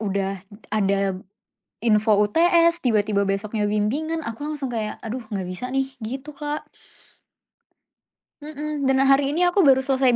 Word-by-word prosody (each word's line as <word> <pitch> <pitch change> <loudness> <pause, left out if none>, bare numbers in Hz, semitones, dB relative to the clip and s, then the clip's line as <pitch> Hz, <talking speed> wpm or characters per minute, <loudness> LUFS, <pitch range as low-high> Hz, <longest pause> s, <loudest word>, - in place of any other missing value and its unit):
Udah 195 -2 -2 0.3
ada 195 -2 +1 0.6
info 215 -1 +3
UTS, 335 +10 +4
tiba-tiba 210 -5 +1
besoknya 205 +2 -1
bimbingan 275 +11 -1
aku 280 +3 -5
langsung 290 -4 -4
kayak, 220 -3 -4
"Aduh 230 +1 -5
nggak 205 -3 -4
bisa 185 +8 -6
nih," 270 0 0 0.2
gitu 265 +5 -6
Kak. 295 0 -4 1.7
Mhm, 300 -2 -4
dan 265 - +3
hari 275 +1 +4
ini 345 - +1
aku 375 +3 0
baru 265 -1 +5
selesai 260 -2 +2
240 Hz, 135 wpm, -23 LUFS, 210-290 Hz, 1.7 s, baru